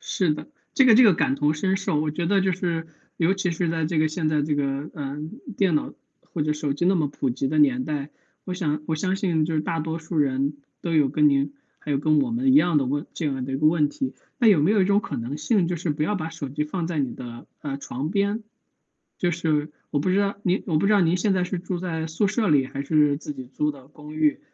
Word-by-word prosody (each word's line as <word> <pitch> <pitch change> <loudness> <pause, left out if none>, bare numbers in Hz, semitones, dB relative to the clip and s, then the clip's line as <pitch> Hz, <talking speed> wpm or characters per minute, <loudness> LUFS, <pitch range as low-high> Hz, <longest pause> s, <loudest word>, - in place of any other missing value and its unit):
是 175 -6 0
的， - - -8 0.3
这 270 - +5
个 230 - +7
这 255 - +8
个 205 - +7
感 135 -4 +1
同 145 +2 +1
身 190 +5 0
受， 190 -6 -1
我 155 0 0
觉 170 +3 -3
得 195 +2 +3
就 190 0 +2
是 170 -2 -2 0.3
尤 175 +3 +3
其 185 -3 -1
是 170 0 -1
在 165 -1 0
这 160 -1 0
个 155 - +3
现 155 0 -1
在 155 -1 +1
这 145 0 0
个， 140 +1 -2
呃， 140 -1 -5 0.4
电 190 -5 +3
脑 150 - -1 0.3
或 160 - -5
者 150 0 +1
手 150 -2 -2
机 175 +5 -1
那 190 - +4
么 155 -4 +1
普 140 -1 -2
及 130 +2 -1
的 155 +3 -1
年 130 -4 +4
代， 150 -2 -3 0.3
我 185 - -4
想 155 -5 -1
我 160 - -1
相 185 +4 0
信 175 -6 +1
就 160 0 -2
是 155 - +1
大 165 0 -2
多 160 +1 -3
数 160 +1 -5
人 140 0 +1 0.2
都 170 -2 -2
有 150 -3 +4
跟 150 +1 +4
您， 140 0 +1 0.3
还 150 - -5
有 140 - +2
跟 155 +1 +3
我 245 - -1
们 260 +3 +2
一 - - +6
样 175 - +5
的 135 - +2
问 145 +4 -2
这 160 - -3
样 135 -3 -1
的 135 - -5
一 - - 0
个 155 - 0
问 155 -2 +3
题。 275 -3 -4 0.3
那 235 - +5
有 195 -7 +6
没 155 +7 +3
有 210 -2 +4
一 - - +3
种 200 +1 +3
可 - - -5
能 120 +5 -4
性 200 -4 +1
就 175 - -1
是 170 +1 -3
不 150 +1 0
要 210 +7 0
把 165 -3 -3
手 160 -4 -6
机 145 +3 -2
放 165 +2 -3
在 165 -3 -2
你 135 -3 -1
的， 120 -1 -9
呃， 140 -3 -4
床 140 +1 -4
边？ 200 +3 0 0.7
就 175 - +1
是 155 -3 0 0.2
我 145 - -1
不 150 - 0
知 190 +2 +3
道 200 0 0
您 185 +1 +1
我 160 -4 +2
不 165 - +1
知 210 - +4
道 205 - +5
您 170 +1 +3
现 195 +2 +1
在 185 -1 +1
是 180 +1 -3
住 175 0 -4
在 165 -3 -3
宿 165 +6 0
舍 215 +1 0
里 140 -4 +3
还 140 +1 -5
是 150 -1 +3
自 150 0 -6
己 130 -2 -8
租 150 +4 -1
的 135 -2 -15
公 150 +1 -12
寓。 155 -1 +2
155 Hz, 295 characters per minute, -24 LUFS, 145-180 Hz, 0.7 s, 这